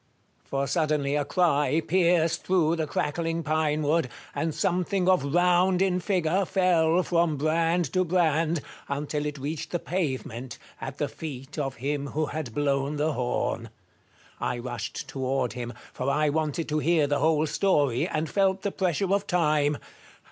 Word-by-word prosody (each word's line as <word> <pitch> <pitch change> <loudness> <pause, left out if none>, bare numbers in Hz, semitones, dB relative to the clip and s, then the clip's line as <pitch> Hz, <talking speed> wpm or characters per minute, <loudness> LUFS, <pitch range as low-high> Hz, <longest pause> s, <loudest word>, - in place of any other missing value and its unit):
For 140 0 -2
suddenly 150 -1 0
a 145 - +1
cry 150 -3 +2
pierced 170 -1 +2
through 170 -3 +2
the 160 -1 -1
crackling 165 +3 -1
pinewood, 155 -1 +1 0.2
and 160 0 -1
something 180 +3 0
of 185 -6 +4
round 180 +1 +4
in 185 -1 +2
figure 180 0 +1
fell 180 -2 +3
from 170 -4 +1
brand 165 +1 +1
to 185 - +3
brand, 165 -2 +1 0.3
until 145 +1 -2
it 150 0 -5
reached 155 +3 -4
the 175 - -1
pavement, 130 -8 -3 0.2
at - - -6
the - - 0
feet 145 -1 -7
of 135 -2 -2
him 140 +3 -2
who 155 +3 -1
had 145 -6 -5
blown 140 0 0
the 150 +1 0
horn. 125 -2 -2 0.7
I 125 - -1
rushed 120 -2 -5
toward 130 -2 -1
him, 120 -1 -5 0.2
for 130 - -2
I 150 +2 +2
wanted 155 +1 -1
to 155 0 +1
hear 160 -1 +3
the 145 0 0
whole 155 -1 +3
story, 145 -8 +1
and 155 +1 -2
felt 195 0 +1
the 200 - -1
pressure 190 +1 0
of 200 0 0
time. 150 -4 +2
155 Hz, 155 wpm, -27 LUFS, 145-175 Hz, 0.7 s, of